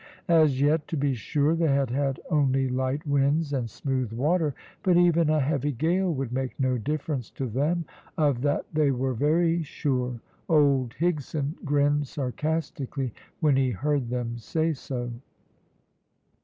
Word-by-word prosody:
As 155 -5 +4
yet, 150 +2 +2
to 160 - -3
be 140 -1 +1
sure, 145 +5 +1
they 165 0 +1
had 135 -3 +1
had 135 0 0
only 135 -3 +2
light 130 +3 -1
winds 145 +2 +1
and 125 -4 -1
smooth 130 0 -2
water, 150 +4 +1 0.3
but 180 -3 +3
even 170 -2 +4
a 155 0 +3
heavy 145 0 0
gale 175 +8 +1
would 135 -5 -3
make 130 +1 -3
no 130 -2 +1
difference 145 0 -3
to 135 - -5
them, 150 +8 0 0.3
of 145 -6 +2
that 145 +1 0
they 155 -2 +3
were 130 0 0
very 165 +6 +2
sure. 125 -5 -2 0.3
Old 140 -6 +3
Higson 155 -3 -1
grinned 145 0 +2
sarcastically 140 -2 -3 0.3
when 150 -4 +4
he 135 -1 +2
heard 135 +2 -1
them 120 -1 -3
say 160 +8 0
so. 125 -3 -5
140 Hz, 150 wpm, -26 LUFS, 130-155 Hz, 0.3 s, As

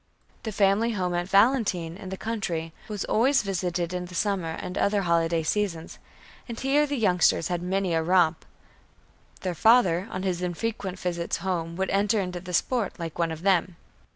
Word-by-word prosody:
The 220 - -4
family 210 +3 +2
home 180 -3 -1
at 175 +1 -2
Valentine, 200 -6 +2
in 190 0 -9
the 190 - -5
country, 175 -8 -3
was 210 -2 -4
always 265 +4 +3
visited 180 -3 -2
in 180 0 -3
the 180 0 -10
summer 185 -4 -1
and 180 - -6
other 200 0 +1
holiday 165 -1 +1
seasons, 170 -2 -2 0.5
and 230 - -5
here 285 +3 +2
the 285 -1 -2
youngsters 180 -6 +3
had 175 -1 -1
many 185 0 -1
a 165 - +2
romp. 175 -1 +2 1.0
Their 185 -2 -2
father 195 -2 +4
on 185 - -4
his 180 -2 -1
infrequent 190 +1 -3
visits 170 -2 -2
home 170 -3 -2
would 190 +1 -1
enter 205 +2 +2
into 180 -2 -3
the 180 +1 -9
sport 220 +4 0
like 165 -1 -6
one 165 -1 +1
of 160 +1 -7
them. 185 -2 +2
185 Hz, 180 wpm, -26 LUFS, 170-205 Hz, 1.0 s, father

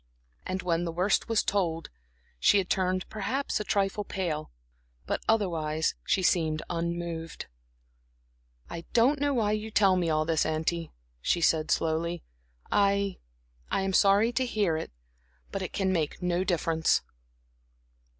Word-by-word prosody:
And 185 0 -3
when 170 -1 +1
the 170 - -2
worst 185 +7 +1
was 225 -2 +2
told, 170 -5 -1 0.5
she 205 - +5
had 190 -2 0
turned 185 -1 0
perhaps 255 +6 -2
a - - -2
trifle 200 0 0
pale, 170 -6 -3 0.6
but - - -2
otherwise 160 -8 +1
she 185 - +1
seemed 160 -3 +2
unmoved. 170 -1 -3 1.2
"I 170 0 -7
don't 260 +5 +4
know 290 0 +2
why 215 -3 +2
you 215 +1 -2
tell 195 -3 +4
me 175 -2 +1
all 155 0 +1
this, 160 -1 +2
auntie," 160 +1 -1 0.3
she 175 - +1
said, 155 -1 +2
slowly. 165 +1 0 0.5
"I 200 -1 +2 0.5
I - - 0
am 195 0 -1
sorry 200 +4 +5
to 260 +2 0
hear 205 -8 +1
it, 160 - -4 0.6
but - - -3
it - - -4
can 190 -1 0
make 160 -4 -1
no 180 0 0
difference." 165 -3 +1
180 Hz, 145 wpm, -28 LUFS, 165-200 Hz, 1.2 s, she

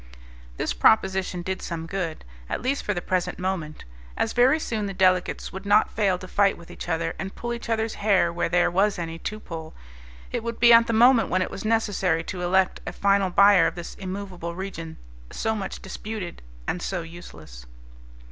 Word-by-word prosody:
This - - -1
proposition 190 - +2
did 190 +1 -3
some 165 -2 -5
good, 170 - -4 0.2
at - - -2
least 275 +3 0
for - - -2
the 175 - -3
present 185 -1 -1
moment. 180 -5 -4 0.3
As 225 - 0
very 260 +6 +4
soon 220 -8 -2
the 195 - -5
delegates 185 -1 +1
would 190 +1 -6
not 205 +1 +4
fail 195 -4 +1
to 185 - -10
fight 200 +1 +2
with 170 - -13
each - - -8
other, 165 0 -1
and 195 0 -5
pull 240 0 -4
each 235 0 -7
other's 225 0 0
hair 195 -5 +3
where 175 - -1
there 175 0 +3
was 195 +3 +2
any 165 -1 -5
to 215 +5 -5
pull, 160 -5 -8 0.6
it - - -2
would 230 0 -4
be 235 0 +7
at 230 0 +7
the - - 0
moment 235 +1 +5
when 185 +1 +2
it - - -6
was - - -6
necessary 205 -7 +1
to 180 +1 -6
elect 185 +1 +2
a - - -2
final 200 -1 +2
buyer 200 -1 +6
of - - -4
this 175 -1 -7
immovable 185 -3 -6
region, 170 -4 -6 0.3
so 220 - -1
much 200 -3 -5
disputed 195 -2 -6 0.3
and 175 - -2
so 180 -2 -3
useless. 80 - -12
190 Hz, 195 wpm, -25 LUFS, 175-210 Hz, 0.6 s, be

